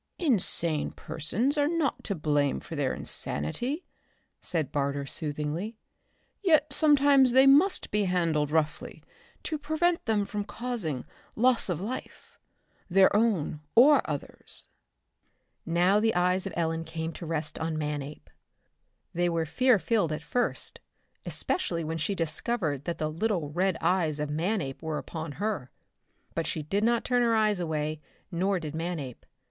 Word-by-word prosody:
"Insane 175 Hz, -, +1 dB
persons 230 Hz, -, -1 dB
are 290 Hz, -, +3 dB
not 325 Hz, -4 st, 0 dB
to 200 Hz, -, -1 dB
blame 145 Hz, -3 st, +1 dB
for 165 Hz, -, -8 dB
their 140 Hz, -3 st, 0 dB
insanity," 245 Hz, -, -3 dB, 0.6 s
said 160 Hz, -6 st, -2 dB
Barter 140 Hz, 0 st, -1 dB
soothingly. 155 Hz, +9 st, -4 dB, 0.6 s
"Yet 310 Hz, -7 st, +3 dB
sometimes 285 Hz, -4 st, +5 dB
they 265 Hz, +1 st, +7 dB
must 295 Hz, +8 st, +4 dB
be 210 Hz, -1 st, +2 dB
handled 165 Hz, -5 st, +1 dB
roughly 155 Hz, 0 st, -1 dB, 0.4 s
to 310 Hz, -3 st, -3 dB
prevent 315 Hz, +4 st, +1 dB
them 215 Hz, -3 st, +1 dB
from 205 Hz, 0 st, -3 dB
causing 215 Hz, -, -4 dB, 0.3 s
loss 245 Hz, -2 st, +3 dB
of 170 Hz, -3 st, -1 dB
life, 225 Hz, +7 st, -7 dB, 0.5 s
their 190 Hz, +2 st, +5 dB
own 205 Hz, -9 st, +1 dB
or 275 Hz, +4 st, +7 dB
others." 145 Hz, -2 st, -6 dB, 1.0 s
Now 175 Hz, +4 st, +3 dB
the 225 Hz, -1 st, +1 dB
eyes 180 Hz, +2 st, +2 dB
of -, -, -6 dB
Ellen 165 Hz, -1 st, 0 dB
came 165 Hz, 0 st, -4 dB
to 170 Hz, -, -8 dB
rest 155 Hz, -2 st, -3 dB
on 160 Hz, -1 st, -2 dB
Manape. 150 Hz, -1 st, -4 dB, 0.9 s
They 175 Hz, +1 st, +1 dB
were 165 Hz, -1 st, 0 dB
fear 255 Hz, -, +3 dB
filled 200 Hz, -4 st, +1 dB
at 155 Hz, +1 st, -4 dB
first, 245 Hz, +10 st, -1 dB, 0.5 s
especially 170 Hz, -, -2 dB
when 160 Hz, +1 st, -3 dB
she 180 Hz, +6 st, -1 dB
discovered 165 Hz, -, -1 dB
that 170 Hz, -, -2 dB
the 155 Hz, 0 st, -2 dB
little 170 Hz, -3 st, -1 dB
red 185 Hz, +2 st, +1 dB
eyes 165 Hz, -3 st, +1 dB
of 150 Hz, 0 st, -2 dB
Manape 160 Hz, -3 st, -1 dB
were 160 Hz, -2 st, -3 dB
upon 160 Hz, -2 st, -6 dB
her. 195 Hz, -8 st, -3 dB, 0.6 s
But 165 Hz, -1 st, -2 dB
she 155 Hz, -, -3 dB
did 195 Hz, +8 st, -1 dB
not 235 Hz, 0 st, +2 dB
turn 245 Hz, -1 st, +2 dB
her 230 Hz, -1 st, +3 dB
eyes 215 Hz, -3 st, +2 dB
away, 155 Hz, -2 st, -2 dB, 0.3 s
nor 190 Hz, +2 st, +1 dB
did 155 Hz, -3 st, -6 dB
Manape. 160 Hz, -6 st, -5 dB
175 Hz, 145 wpm, -28 LUFS, 155-230 Hz, 1.0 s, they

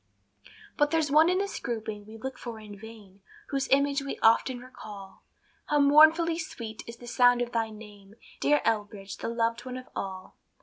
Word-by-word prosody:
But 295 Hz, 0 st, +3 dB
there's 315 Hz, -2 st, +1 dB
one 310 Hz, +3 st, +6 dB
in 365 Hz, -, +2 dB
this 400 Hz, +1 st, -2 dB
grouping 215 Hz, -3 st, -5 dB
we 220 Hz, +1 st, -10 dB
look 260 Hz, +3 st, -6 dB
for 235 Hz, -2 st, -7 dB
in 210 Hz, -1 st, -10 dB
vain, 205 Hz, -2 st, -13 dB, 0.3 s
Whose 275 Hz, -1 st, -1 dB
image 280 Hz, +1 st, +2 dB
we 275 Hz, -, -5 dB
often 230 Hz, +3 st, +4 dB
recall; 210 Hz, -6 st, -11 dB, 0.5 s
How 295 Hz, -, +2 dB
mournfully 315 Hz, +4 st, +6 dB
sweet 230 Hz, -9 st, -7 dB
is 230 Hz, 0 st, -9 dB
the 240 Hz, -, -12 dB
sound 245 Hz, 0 st, +4 dB
of 240 Hz, 0 st, -2 dB
thy 225 Hz, -2 st, 0 dB
name, 210 Hz, -2 st, -13 dB, 0.2 s
Dear 295 Hz, 0 st, +3 dB
Elbridge, 205 Hz, -3 st, -2 dB
the -, -, -4 dB
loved 230 Hz, 0 st, -1 dB
one 255 Hz, 0 st, -6 dB
of 255 Hz, -, -10 dB
all. 190 Hz, -1 st, -6 dB
235 Hz, 180 wpm, -28 LUFS, 215-280 Hz, 0.5 s, one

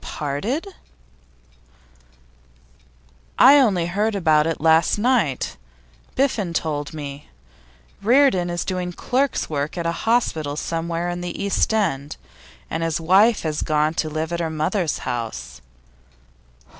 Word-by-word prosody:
'Parted?' 200 Hz, -, -3 dB, 2.7 s
'I 285 Hz, +2 st, +8 dB
only 195 Hz, -10 st, +2 dB
heard 205 Hz, +5 st, -1 dB
about 155 Hz, -5 st, +3 dB
it 165 Hz, -, -2 dB
last 160 Hz, +3 st, +3 dB
night; 220 Hz, -, 0 dB, 0.6 s
Biffen 225 Hz, -10 st, 0 dB
told 150 Hz, -2 st, -2 dB
me. 145 Hz, -2 st, -8 dB, 0.7 s
Reardon 230 Hz, -6 st, +3 dB
is 175 Hz, 0 st, -3 dB
doing 180 Hz, -1 st, -3 dB
clerk's 265 Hz, +9 st, -1 dB
work 150 Hz, +2 st, -3 dB
at 170 Hz, -, -3 dB
a 165 Hz, -, +1 dB, 0.2 s
hospital 160 Hz, -11 st, +1 dB
somewhere 165 Hz, +2 st, -3 dB
in 175 Hz, 0 st, -3 dB
the 175 Hz, -1 st, -5 dB
East 200 Hz, +2 st, +1 dB
end, 160 Hz, -10 st, -1 dB, 0.5 s
and 165 Hz, -, -3 dB
his 165 Hz, -1 st, -1 dB
wife 195 Hz, +7 st, +4 dB
has 155 Hz, -2 st, -2 dB
gone 155 Hz, 0 st, +1 dB
to 160 Hz, -1 st, -2 dB
live 155 Hz, +2 st, -3 dB
at 170 Hz, -, -2 dB
her 165 Hz, -1 st, -1 dB
mother's 160 Hz, +2 st, -1 dB
house. 65 Hz, -, -5 dB
170 Hz, 125 wpm, -22 LUFS, 155-200 Hz, 2.7 s, I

